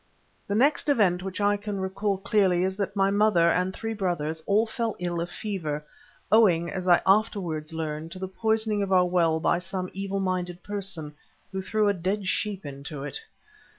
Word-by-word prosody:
The 200 - -1
next 285 +5 +3
event 195 -10 +3
which 190 +1 -5
I 205 0 +3
can 205 -1 -4
recall 195 +1 -1
clearly 190 -2 +2
is 190 0 -1
that 200 0 -2
my 195 0 +3
mother 200 -5 +4
and 180 +2 +1
three 225 +3 -4
brothers 170 -6 -2
all 210 +3 +4
fell 230 -1 -2
ill 175 -1 -2
of 170 - -3
fever, 155 -8 -4 0.5
owing, 180 -7 +4
as 185 -1 -4
I 175 -1 +5
afterwards 190 -7 +1
learned, 160 0 -4
to - - -9
the 190 0 -4
poisoning 220 +1 0
of 195 -1 -2
our 180 -1 +5
well 170 -3 +2
by 170 - +2
some 185 0 -4
evil 195 0 -3
minded 180 -2 -2
person, 195 -7 -3 0.4
who 190 0 -3
threw 210 +2 +1
a 205 - +3
dead 190 +2 -2
sheep 200 -2 -1
into 140 0 -6
it. 145 -2 -2
190 Hz, 185 wpm, -26 LUFS, 175-205 Hz, 0.5 s, I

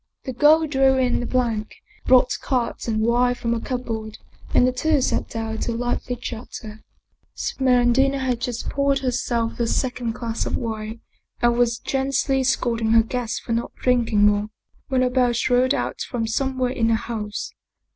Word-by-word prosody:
The 260 - -5
girl 305 +5 +5
drew 270 -3 +3
in 250 -2 +1
the 245 - -3
plank, 230 -4 -1 0.3
brought 255 0 +5
cards 245 -3 -2
and 220 -1 0
wine 245 +2 +2
from 235 -1 -1
a 235 - -1
cupboard, 225 -4 -4 0.3
and - - +4
the 255 - +3
two 300 +4 +1
sat 255 - -1
down 225 -1 -4
to 235 - -2
lively 245 +1 -2
chatter. 220 -2 -8 0.5
Smeraldina 260 +1 +2
had 255 -3 -1
just 240 -1 -3
poured 280 0 +1
herself 240 -3 -1
the 235 - 0
second 245 -2 -1
glass 230 -2 -3
of - - -1
wine 220 -1 -5 0.4
and 240 0 +3
was 235 -1 +2
gently 270 +1 0
scolding 230 -3 +1
her 225 -1 +6
guest 240 0 -3
for - - -6
not 230 +1 -2
drinking 235 -5 +2
more, 205 0 +2 0.4
when 260 -1 +1
a 250 - +2
bell 250 -1 +2
shrilled 250 +2 +2
out - - -3
from 235 -3 -2
somewhere 260 +2 -1
in 230 -3 0
the 230 - +3
house. 215 -2 -5
245 Hz, 170 wpm, -23 LUFS, 230-260 Hz, 0.5 s, her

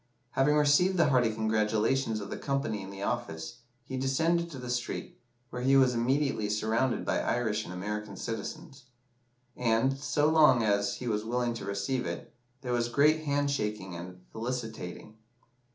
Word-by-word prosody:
Having 145 +3 +3
received 150 +6 +4
the 165 -4 +4
hearty 125 -4 +3
congratulations 110 +2 +1
of 100 -1 -7
the - - -3
company 135 -7 -1
in 95 - -8
the 100 0 -7
office, 80 -9 -3 0.3
he 130 +1 -5
descended 165 +6 +1
to 145 - -8
the 125 -1 -7
street, 125 0 -4 0.3
where 125 - -4
he 135 +2 +4
was 130 -2 +5
immediately 125 -2 +1
surrounded 110 +4 0
by - - +1
Irish 110 -3 0
and - - -8
American 105 +4 -5
citizens; 135 +4 -6 0.7
and, 120 +3 +2
so 145 +2 +1
long 150 -7 +5
as 100 -1 +1
he 125 - -6
was 105 -2 0
willing 120 +1 -1
to 115 - -6
receive 100 +6 -1
it, - - -6 0.3
there 125 -2 -2
was 120 0 +1
great 150 +5 +3
hand 145 -1 +1
shaking 105 -8 -3
and 90 +1 -8
felicitating. 110 -4 -5
120 Hz, 165 wpm, -30 LUFS, 105-135 Hz, 0.7 s, was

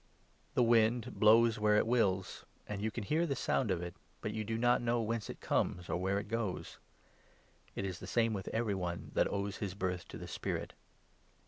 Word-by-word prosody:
The 125 - +5
wind 115 +1 +3
blows 115 +1 +6
where 105 0 +4
it 105 - +4
wills, 100 -6 +1 0.2
and 100 -1 -4
you 110 - 0
can 110 +1 -5
hear 160 - +1
the 140 - 0
sound 125 -2 0
of 90 -2 0
8 90 - -3
it, - - -19 0.2
but - - -3
you 110 - -2
do 110 +1 -2
not 120 +1 +3
know 120 0 +1
whence 115 -1 -2
it - - -7
comes, 90 0 0
or - - +1
where 95 +2 0
it 100 0 -3
goes; 110 -3 -3 1.0
it 100 - -2
is 95 -2 -4
the - - -8
same 115 -2 +2
with 95 -2 -4
every 115 -2 0
one 90 -2 -4
that - - +2
owes 100 +1 -2
his 95 -3 -4
birth 90 -2 -2
to - - -8
the - - -8
Spirit." - - -3
105 Hz, 215 wpm, -34 LUFS, 95-115 Hz, 1.0 s, blows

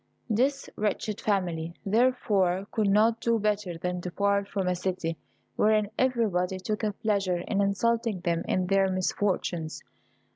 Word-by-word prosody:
This 270 +6 +1
wretched 210 0 -1
family, 175 -5 -1
therefore, 200 -5 +2
could 215 -3 +1
not 220 +3 +3
do 230 -1 +2
better 205 -5 -1
than 180 +1 -3
depart 200 +3 0
from 195 -2 -2
a 180 - +2
city 175 -2 -2 0.4
wherein 215 -1 +3
everybody 215 -8 +1
took 210 +3 -3
a 210 -1 0
pleasure 200 -4 0
in 200 +3 -1
insulting 220 0 +1
them 170 -1 0
in 185 - +1
their 195 +1 +3
misfortunes. 185 -3 -1
200 Hz, 140 wpm, -28 LUFS, 180-215 Hz, 0.4 s, not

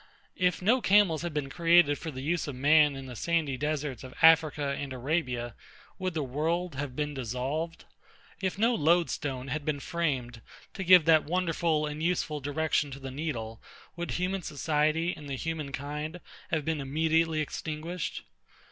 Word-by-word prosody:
If 180 0 +1
no 240 +6 +4
camels 195 -7 +4
had 175 0 -3
been 145 -2 -3
created 170 -3 +4
for 165 - -5
the 130 -3 -6
use 165 +3 -1
of 140 - -5
man 150 +2 +5
in 135 0 -7
the 125 -2 -8
sandy 160 +1 0
deserts 145 -2 -3
of 130 - -10
AFRICA 155 -3 +5
and 140 -1 -5
ARABIA, 125 -3 -2 0.5
would 185 -2 -2
the 155 - 0
world 160 +7 -1
have 135 -1 -5
been 150 0 -2
dissolved? 135 +6 -3 0.6
If 190 -1 -1
no 230 +4 +3
lodestone 150 - +1
had 150 +2 -2
been 145 -1 -1
framed 135 -8 -2 0.3
to 190 - -4
give 180 -3 +7
that 160 -2 +5
wonderful 165 -2 0
and 150 +1 -5
useful 165 -3 0
direction 145 +1 0
to 135 0 -8
the 135 -1 -7
needle, 120 -7 -4 0.3
would 175 0 -4
human 185 +2 -1
society 155 +2 0
and 150 -2 -10
the 135 - -2
human 155 0 -4
kind 150 +4 -5 0.3
have 155 -3 -1
been 160 -2 -1
immediately 160 +3 +1
extinguished? 155 +3 -4
155 Hz, 165 wpm, -29 LUFS, 140-170 Hz, 0.6 s, give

